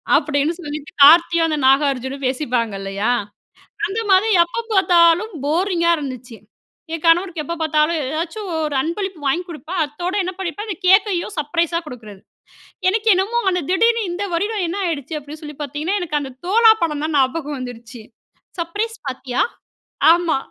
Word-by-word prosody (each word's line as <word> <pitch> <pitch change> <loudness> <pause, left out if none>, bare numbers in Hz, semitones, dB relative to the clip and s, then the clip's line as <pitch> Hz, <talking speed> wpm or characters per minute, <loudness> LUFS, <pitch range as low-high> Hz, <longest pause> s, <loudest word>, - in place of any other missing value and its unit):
அப்டீன்னு 290 +2 +1
சொல்லிட்டு, 295 0 -7
கார்த்தியும், 330 +2 +6
அந்த 305 - -1
நாகார்ஜுனும் 270 -1 +1
பேசிப்பாங்க 250 -5 -1
இல்லயா. 200 +4 -1 0.8
அந்த 410 +4 -3
மாதிரி, 385 +4 +4
எப்ப 405 +7 -5
பாத்தாலும் 355 +2 +4
போரிங்கா 340 +2 +1
இருந்துச்சு. 255 -5 -7 0.6
என் 330 - -5
கணவருக்கு 335 0 +3
எப்ப 335 +4 -4
பாத்தாலும், 310 +1 +1
ஏதாச்சும் 335 +7 -4 0.2
ஒரு 295 -2 -3
அன்பளிப்பு 370 +2 -4
வாங்கிக் 350 +7 0
குடுப்பேன். 340 +2 -5
அத்தோடு 350 +6 -5
என்ன 370 - -3
பண்ணிப்பேன்? 380 +4 -4
அந்த 395 - -3
கேக்கையும் 385 0 +3
சர்ப்ரைஸா 335 +3 0
குடுக்குறது. 215 -7 -10 0.7
எனக்கு 440 +3 -1
என்னமோ, 395 +6 0
அந்த 360 - 0
திடீர்னு 460 +5 +3
இந்த 375 +4 -3
வருடம் 410 +2 -1
என்ன 370 - -3
ஆகிடுச்சு 310 -1 -3
அப்டீன்னு 300 +2 -11
சொல்லி 295 -1 -9
பாத்தீங்கன்னா, 300 +7 -2
எனக்கு 300 -4 -1
அந்த 270 -2 -7
தோழா 445 +4 +6
படம் 300 -3 -1
தான் 315 - -4
ஞாபகம் 285 +2 0
வந்துடுச்சு. 245 -1 -9 0.6
"சர்ப்ரைஸ் 425 +7 -3
பார்ட்டியா?" 255 -1 -2 0.7
"ஆமா, 340 -4 +1
330 Hz, 145 wpm, -20 LUFS, 285-370 Hz, 0.8 s, கார்த்தியும்